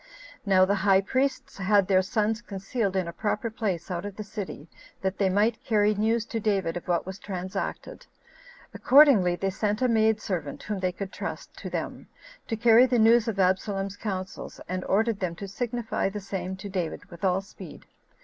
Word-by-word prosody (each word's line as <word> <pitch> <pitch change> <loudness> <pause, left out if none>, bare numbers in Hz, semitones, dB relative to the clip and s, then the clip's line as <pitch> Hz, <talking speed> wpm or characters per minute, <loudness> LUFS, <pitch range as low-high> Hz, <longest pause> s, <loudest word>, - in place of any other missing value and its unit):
Now 185 -1 +5
the 200 - +1
high 195 -1 +5
priests 260 +3 -1
had 195 0 +3
their 190 -1 +4
sons 215 +2 0
concealed 200 -1 -3
in 185 -2 0
a 170 - -5
proper 210 +4 -2
place 195 -6 -3
out 175 0 -3
of 205 -1 -6
the 215 - -5
city, 200 -7 -7 0.4
that 190 0 -2
they 195 -2 +3
might 210 +4 +1
carry 210 -3 +3
news 220 +2 +1
to 225 - 0
David 195 -6 0
of 175 - -6
what 175 -1 +1
was 190 +1 -7
transacted. 185 -2 -5 0.7
Accordingly, 255 -11 +6
they 195 +2 -1
sent 210 +2 -1
a 255 - +2
maid 220 -2 +3
servant, 175 -9 -4
whom 210 -2 -3
they 185 -1 0
could 190 +1 -6
trust, - - -6
to - - -6
them, - - -5 0.4
to 225 - -1
carry 235 +2 +6
the 250 -1 +1
news 230 +1 +5
of 210 -3 -2
Absalom's 195 +1 0
counsels, 190 -3 -5
and 185 0 -3
ordered 220 +1 +1
them 175 -3 -2
to 200 +3 -7
signify 235 0 -2
the 210 +1 -5
same 190 -1 -4
to 190 +2 -8
David 185 -5 -3
with 170 +1 -12
all 190 0 +2
speed. 195 - -12
200 Hz, 190 wpm, -27 LUFS, 185-220 Hz, 0.7 s, Accordingly